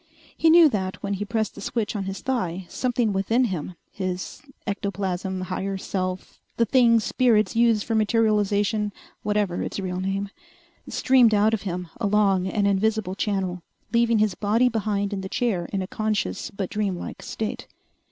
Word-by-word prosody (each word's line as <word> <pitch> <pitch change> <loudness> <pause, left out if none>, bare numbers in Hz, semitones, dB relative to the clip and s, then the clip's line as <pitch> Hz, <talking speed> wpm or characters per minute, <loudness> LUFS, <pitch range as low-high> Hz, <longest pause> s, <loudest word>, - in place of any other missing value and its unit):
He 325 - +3
knew 335 0 +8
that 190 -5 -3
when 200 0 -1
he 200 +1 -3
pressed 220 0 -1
the 205 - -10
switch 220 +1 -2
on 200 -2 -2
his 195 0 -5
thigh 190 -9 -2
something 240 -4 0
within 225 +6 +2
him 185 -6 -3 0.2
his 185 -2 -4 0.2
ectoplasm, 190 -2 -2
higher 190 +1 -3
self, 185 -1 -4 0.2
the 230 - +3
thing 235 -1 +5
spirits 225 -1 +2
use 230 -2 +3
for 230 - -3
materialization, 210 -1 +2 0.3
whatever 210 -4 0
its - - -4
real 185 -1 -3
name 195 +1 -2 0.6
streamed 245 -4 +4
out 210 +2 +3
of 220 - 0
him 180 0 -4
along 200 -4 +2
an 200 +2 0
invisible 200 0 +1
channel, 190 -3 -2 0.3
leaving 235 -1 +3
his 210 -2 +2
body 220 +6 +2
behind 210 -3 -1
in 195 - -3
the 190 - -6
chair 200 -8 0
in 195 -2 -1
a - - -6
conscious 210 - -2
but 195 -2 -5
dream 205 -4 -1
like - - -7
state. 220 -1 -4
205 Hz, 165 wpm, -24 LUFS, 190-220 Hz, 0.6 s, knew